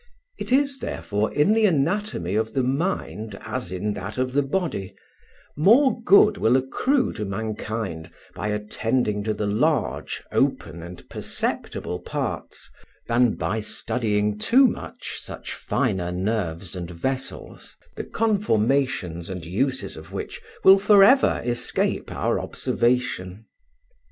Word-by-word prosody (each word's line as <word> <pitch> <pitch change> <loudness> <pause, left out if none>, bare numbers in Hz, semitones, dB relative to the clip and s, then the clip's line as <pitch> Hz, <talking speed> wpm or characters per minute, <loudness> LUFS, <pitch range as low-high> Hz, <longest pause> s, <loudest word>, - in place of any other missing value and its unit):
It - - -5
is 275 0 +3
therefore 105 +1 -2
in 150 +9 +3
the 220 0 +4
anatomy 165 - 0
of 110 +1 -1
the 130 - +2
Mind 125 - -2
as 90 - -4
in 100 +3 -2
that 100 +4 -6
of 130 0 -1
the 145 - +3
Body; 135 - -2 0.6
more 235 - +4
good 200 0 +6
will 120 -3 +4
accrue 250 - +1
to 105 - -4
mankind 105 -4 -4 0.2
by - - -4
attending 105 +1 -1
to 110 -1 0
the 105 - -2
large, 125 +6 0
open, 85 - 0
and 90 +1 -10
perceptible 90 - -3
parts, - - -5 0.4
than 120 -1 +3
by 110 +3 -1
studying 105 -1 -1
too 260 - +5
much 245 - -3
such - - -7
finer 90 -2 -1
nerves 90 -2 -2
and 85 -2 -5
vessels, 130 +10 -5 0.2
the - - -4
conformations 130 - 0
and 90 -3 -6
uses 105 +3 -1
of 80 +4 -11
which 95 - -6 0.2
will 195 +1 +8
for 205 0 +6
ever 265 +7 +5
escape 120 -1 -1
our - - 0
observation. 115 -5 -1
110 Hz, 130 wpm, -24 LUFS, 100-155 Hz, 0.6 s, will